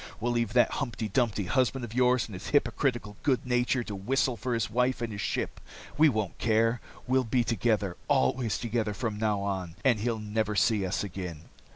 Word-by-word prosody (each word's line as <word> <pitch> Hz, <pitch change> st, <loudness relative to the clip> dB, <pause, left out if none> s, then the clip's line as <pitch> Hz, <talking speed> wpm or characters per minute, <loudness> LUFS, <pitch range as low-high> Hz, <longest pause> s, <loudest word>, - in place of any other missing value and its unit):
We'll 120 Hz, +2 st, 0 dB
leave 115 Hz, -3 st, 0 dB
that 120 Hz, -1 st, +4 dB
humpty 115 Hz, -6 st, -3 dB
dumpty 115 Hz, -3 st, +1 dB
husband 130 Hz, +2 st, +1 dB
of 110 Hz, -, -10 dB
yours 125 Hz, 0 st, +3 dB
and 110 Hz, -, -10 dB
his 95 Hz, +2 st, -7 dB
hypocritical 120 Hz, -7 st, 0 dB
good 130 Hz, -4 st, +1 dB
nature 125 Hz, 0 st, +1 dB
to 105 Hz, -, -6 dB
whistle 120 Hz, +6 st, 0 dB
for 125 Hz, +1 st, -2 dB
his 115 Hz, -3 st, 0 dB
wife 125 Hz, +4 st, +1 dB
and 115 Hz, -2 st, -3 dB
his 100 Hz, -, -4 dB
ship. -, -, -2 dB, 0.3 s
We 155 Hz, +2 st, +6 dB
won't 110 Hz, -7 st, -2 dB
care. 115 Hz, +1 st, +2 dB, 0.2 s
We'll 130 Hz, +1 st, +2 dB
be 120 Hz, +1 st, +1 dB
together, 110 Hz, -4 st, 0 dB
always 110 Hz, -, +2 dB
together 115 Hz, -3 st, -1 dB
from 110 Hz, -3 st, -3 dB
now 105 Hz, -2 st, +1 dB
on, 95 Hz, -4 st, -3 dB
and 120 Hz, -5 st, +4 dB
he'll 115 Hz, +1 st, -1 dB
never 105 Hz, 0 st, -2 dB
see 105 Hz, -2 st, +2 dB
us 95 Hz, -, -1 dB
again." 90 Hz, -5 st, -6 dB
115 Hz, 195 wpm, -29 LUFS, 105-125 Hz, 0.3 s, We